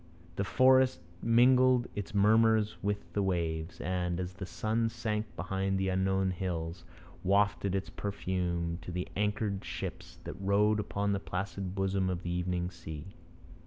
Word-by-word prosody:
The 100 Hz, -, 0 dB
forest 130 Hz, +4 st, +4 dB, 0.2 s
mingled 125 Hz, +1 st, +5 dB
its 100 Hz, -1 st, -5 dB
murmurs 110 Hz, +1 st, +4 dB
with 100 Hz, 0 st, -3 dB
the 100 Hz, -, +1 dB
waves, 85 Hz, -3 st, -1 dB
and, 90 Hz, -1 st, -1 dB
as 90 Hz, 0 st, -4 dB
the 95 Hz, +1 st, -7 dB
sun 110 Hz, +6 st, 0 dB
sank 110 Hz, -1 st, -3 dB
behind 95 Hz, +3 st, -1 dB
the 95 Hz, 0 st, 0 dB
unknown 95 Hz, 0 st, +1 dB
hills, 85 Hz, -2 st, -3 dB, 0.4 s
wafted 100 Hz, 0 st, +2 dB
its 95 Hz, 0 st, -3 dB
perfume 90 Hz, -4 st, -2 dB
to -, -, -7 dB
the 90 Hz, +1 st, -3 dB
anchored 105 Hz, -1 st, -1 dB
ships 90 Hz, -1 st, -6 dB
that 95 Hz, -, -7 dB
rode 105 Hz, +2 st, +3 dB
upon 100 Hz, -1 st, -1 dB
the 100 Hz, -, 0 dB
placid 95 Hz, 0 st, -4 dB
bosom 95 Hz, -1 st, +1 dB
of 90 Hz, -1 st, -3 dB
the 85 Hz, -, -3 dB
evening 90 Hz, 0 st, -1 dB
sea. 80 Hz, +1 st, -8 dB
95 Hz, 150 wpm, -31 LUFS, 90-105 Hz, 0.4 s, mingled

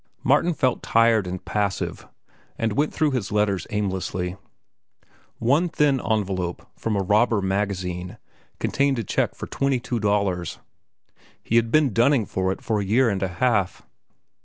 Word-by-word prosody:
Martin 145 Hz, +7 st, +3 dB
felt 130 Hz, -6 st, 0 dB
tired 115 Hz, -4 st, +3 dB
and 90 Hz, 0 st, -6 dB
passive, 100 Hz, -2 st, -2 dB, 0.5 s
and 115 Hz, -2 st, 0 dB
went 145 Hz, +7 st, +1 dB
through 155 Hz, -2 st, +1 dB
his 120 Hz, -7 st, -2 dB
letters 105 Hz, -2 st, 0 dB
aimlessly. 95 Hz, -4 st, -2 dB, 1.0 s
One 145 Hz, +10 st, +2 dB
thin 145 Hz, -5 st, +2 dB
envelope, 95 Hz, -5 st, -2 dB
from 110 Hz, -2 st, -2 dB
a 100 Hz, -, 0 dB
robber 105 Hz, +3 st, +3 dB
magazine, 95 Hz, -2 st, -2 dB, 0.4 s
contained 140 Hz, -1 st, +1 dB
a 115 Hz, -, -1 dB
check -, -, -1 dB
for -, -, -6 dB
twenty 135 Hz, -2 st, 0 dB
two 120 Hz, 0 st, -3 dB
dollars. 100 Hz, -5 st, 0 dB, 0.9 s
He 115 Hz, -, -1 dB
had 115 Hz, -1 st, +3 dB
been 145 Hz, -2 st, +3 dB
dunning 120 Hz, +1 st, +3 dB
for 95 Hz, 0 st, -1 dB
it -, -, -6 dB
for 110 Hz, -2 st, 0 dB
a -, -, -1 dB
year 115 Hz, +5 st, +3 dB
and 95 Hz, -, -2 dB
a 95 Hz, -, +1 dB
half. 100 Hz, +1 st, 0 dB
105 Hz, 155 wpm, -24 LUFS, 95-125 Hz, 1.0 s, Martin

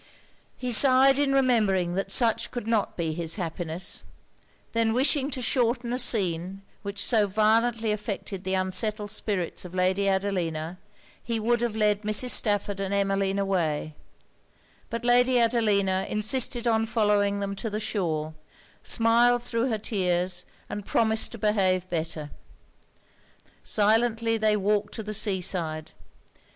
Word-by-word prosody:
He 250 Hz, -1 st, -4 dB
sighed 265 Hz, +3 st, +5 dB
in 285 Hz, -1 st, +2 dB
remembering 215 Hz, -10 st, +2 dB
that 195 Hz, +2 st, -2 dB
such 230 Hz, -1 st, +2 dB
could 245 Hz, -3 st, -6 dB
not 225 Hz, -3 st, 0 dB
be 165 Hz, -2 st, -2 dB
his 165 Hz, 0 st, -2 dB
happiness; 175 Hz, -1 st, -3 dB, 0.7 s
then 230 Hz, -1 st, +1 dB
wishing 275 Hz, +2 st, +2 dB
to 260 Hz, -3 st, -4 dB
shorten 240 Hz, 0 st, +1 dB
a 250 Hz, -, -1 dB
scene 190 Hz, -5 st, 0 dB, 0.2 s
which 200 Hz, -1 st, -3 dB
so 215 Hz, -4 st, +3 dB
violently 220 Hz, +2 st, +1 dB
affected 205 Hz, -2 st, -5 dB
the 190 Hz, +1 st, -1 dB
unsettled 205 Hz, +3 st, -1 dB
spirits 190 Hz, -6 st, -2 dB
of 180 Hz, 0 st, -10 dB
Lady 185 Hz, +2 st, +1 dB
Adelina, 180 Hz, -4 st, -2 dB, 0.4 s
he 230 Hz, -1 st, -3 dB
would 235 Hz, +2 st, +1 dB
have 235 Hz, -3 st, -1 dB
led 210 Hz, -1 st, +1 dB
Mrs. 215 Hz, +4 st, +1 dB
Stafford 205 Hz, -2 st, +1 dB
and 195 Hz, 0 st, -2 dB
Emmeline 195 Hz, 0 st, 0 dB
away; 170 Hz, -6 st, -1 dB, 1.0 s
but 230 Hz, 0 st, -5 dB
Lady 245 Hz, +1 st, +4 dB
Adelina 205 Hz, -5 st, +1 dB
insisted 235 Hz, +3 st, 0 dB
on 225 Hz, -1 st, +2 dB
following 205 Hz, -2 st, +1 dB
them 200 Hz, 0 st, -3 dB
to 225 Hz, -, -4 dB
the 210 Hz, 0 st, -3 dB
shore; 160 Hz, -8 st, -2 dB, 0.5 s
smiled 235 Hz, +1 st, +3 dB
thro' 235 Hz, +1 st, -1 dB
her 220 Hz, -, 0 dB
tears; 180 Hz, -4 st, -1 dB, 0.2 s
and 205 Hz, -, -6 dB
promised 220 Hz, +1 st, +1 dB
to -, -, -7 dB
behave 190 Hz, -4 st, +1 dB
better. 160 Hz, -3 st, -4 dB, 1.3 s
Silently 225 Hz, +2 st, +1 dB
they 215 Hz, -1 st, +2 dB
walked 205 Hz, +1 st, 0 dB
to 220 Hz, -, -5 dB
the 210 Hz, 0 st, -5 dB
sea 200 Hz, -3 st, 0 dB
side. 160 Hz, -4 st, -2 dB
210 Hz, 140 wpm, -26 LUFS, 190-230 Hz, 1.3 s, sighed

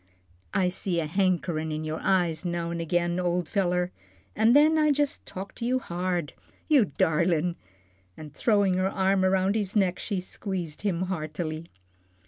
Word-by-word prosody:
"I 185 Hz, -2 st, +3 dB
see 180 Hz, -1 st, -1 dB
a 160 Hz, -, -1 dB
hankerin' 170 Hz, -2 st, 0 dB
in 155 Hz, 0 st, -3 dB
your 155 Hz, 0 st, -3 dB
eyes 175 Hz, -4 st, +1 dB
now 170 Hz, -1 st, -2 dB
an' 170 Hz, 0 st, -3 dB
agin, 175 Hz, +1 st, 0 dB
ole 180 Hz, 0 st, 0 dB
feller, 180 Hz, 0 st, 0 dB, 0.4 s
an' 220 Hz, +2 st, +4 dB
then 300 Hz, +3 st, +6 dB
I 305 Hz, 0 st, +4 dB
jus' 290 Hz, 0 st, +1 dB
talk 195 Hz, +1 st, -7 dB
to -, -, -6 dB
you 255 Hz, +2 st, +2 dB
hard. 175 Hz, -, -2 dB, 0.3 s
You 285 Hz, -8 st, +5 dB
darlin'!" 170 Hz, +1 st, +2 dB, 0.6 s
and 150 Hz, -2 st, -10 dB
throwing 205 Hz, 0 st, +2 dB
her 185 Hz, +1 st, +1 dB
arm 190 Hz, 0 st, +1 dB
around 190 Hz, +1 st, +2 dB
his 205 Hz, -2 st, -2 dB
neck, 185 Hz, -3 st, +2 dB
she 200 Hz, -4 st, -2 dB
squeezed 180 Hz, -4 st, -5 dB
him 185 Hz, -4 st, 0 dB
heartily. 160 Hz, -2 st, -4 dB
180 Hz, 160 wpm, -27 LUFS, 170-195 Hz, 0.6 s, then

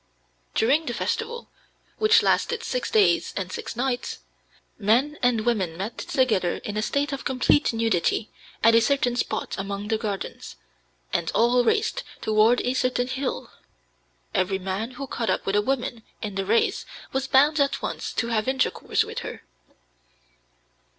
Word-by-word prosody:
During 285 Hz, +8 st, +3 dB
the 240 Hz, -, -2 dB
festival, 475 Hz, -, -3 dB, 0.5 s
which 435 Hz, +1 st, +5 dB
lasted 470 Hz, -1 st, +1 dB
six -, -, -2 dB
days 430 Hz, -2 st, +3 dB
and -, -, -3 dB
six 460 Hz, -, -5 dB
nights, 250 Hz, +1 st, -2 dB, 0.6 s
men 245 Hz, +9 st, +2 dB
and 235 Hz, -3 st, +2 dB
women 190 Hz, -9 st, 0 dB
met 200 Hz, +5 st, -4 dB
together 220 Hz, -10 st, +1 dB
in 205 Hz, -, -4 dB
a 215 Hz, -, 0 dB
state 280 Hz, +5 st, 0 dB
of 275 Hz, -, -4 dB
complete 265 Hz, +2 st, +2 dB
nudity 225 Hz, -2 st, 0 dB, 0.3 s
at 230 Hz, -, +7 dB
a 230 Hz, -, +6 dB
certain 260 Hz, -1 st, +1 dB
spot 245 Hz, -, -2 dB
among 200 Hz, +1 st, -4 dB
the 220 Hz, -1 st, +1 dB
gardens, 205 Hz, -3 st, -5 dB, 0.6 s
and 165 Hz, -, 0 dB
all 245 Hz, +2 st, +4 dB
raced 445 Hz, -, +1 dB, 0.2 s
toward 220 Hz, +3 st, +3 dB
a 250 Hz, -, 0 dB
certain 255 Hz, -1 st, +1 dB
hill. 260 Hz, +1 st, -3 dB, 0.8 s
Every 190 Hz, +1 st, +1 dB
man 190 Hz, +4 st, -3 dB
who 275 Hz, -, -4 dB
caught 235 Hz, -3 st, -3 dB
up -, -, 0 dB
with 195 Hz, -, 0 dB
a 205 Hz, -, +4 dB
woman 245 Hz, 0 st, -2 dB, 0.2 s
in 210 Hz, -2 st, -5 dB
the 195 Hz, 0 st, -3 dB
race 230 Hz, +2 st, +2 dB, 0.3 s
was 265 Hz, 0 st, -1 dB
bound 290 Hz, +4 st, +4 dB
at 280 Hz, 0 st, +1 dB
once -, -, -3 dB
to 235 Hz, -, -1 dB
have 220 Hz, 0 st, 0 dB
intercourse 265 Hz, -1 st, +1 dB
with -, -, -5 dB
her. -, -, -7 dB
240 Hz, 155 wpm, -25 LUFS, 215-270 Hz, 0.8 s, at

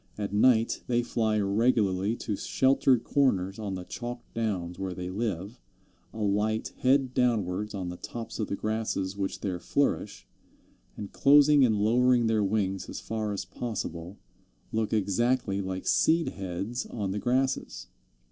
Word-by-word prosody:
At 100 Hz, -1 st, -4 dB
night 115 Hz, +1 st, +3 dB
they 120 Hz, -1 st, +1 dB
fly 110 Hz, -3 st, 0 dB
regularly 100 Hz, -1 st, +1 dB
to 105 Hz, -, -3 dB
sheltered 130 Hz, +1 st, +2 dB
corners 100 Hz, -10 st, +1 dB
on 100 Hz, -3 st, -3 dB
the 90 Hz, -, -6 dB
chalk 120 Hz, +5 st, -6 dB
downs 95 Hz, -6 st, -2 dB
where 95 Hz, -2 st, -3 dB
they 90 Hz, 0 st, -5 dB
live, 105 Hz, +1 st, -4 dB, 0.5 s
alight 105 Hz, +1 st, -1 dB
head 130 Hz, 0 st, +2 dB
downwards 105 Hz, -5 st, 0 dB
on 90 Hz, -2 st, -4 dB
the 90 Hz, -, -7 dB
tops 115 Hz, +4 st, -7 dB
of 110 Hz, -, -1 dB
the -, -, -2 dB
grasses 110 Hz, -3 st, -2 dB
which 100 Hz, -1 st, -3 dB
there 95 Hz, -3 st, -2 dB
flourish, 140 Hz, +9 st, -1 dB, 0.7 s
and 100 Hz, -, -7 dB
closing 145 Hz, 0 st, +6 dB
and 115 Hz, -4 st, +3 dB
lowering 120 Hz, +3 st, +3 dB
their 110 Hz, -2 st, +2 dB
wings 95 Hz, -1 st, -1 dB
as -, -, -5 dB
far 110 Hz, -1 st, -3 dB
as 100 Hz, -2 st, -4 dB
possible, 95 Hz, -3 st, -5 dB, 0.5 s
look 110 Hz, -1 st, -1 dB
exactly 105 Hz, 0 st, +1 dB
like 95 Hz, -1 st, -4 dB
seed 165 Hz, +1 st, +3 dB
heads 95 Hz, +5 st, -4 dB
on 100 Hz, -5 st, -3 dB
the 105 Hz, -, -2 dB
grasses. 130 Hz, +3 st, -1 dB
110 Hz, 145 wpm, -28 LUFS, 95-120 Hz, 0.7 s, closing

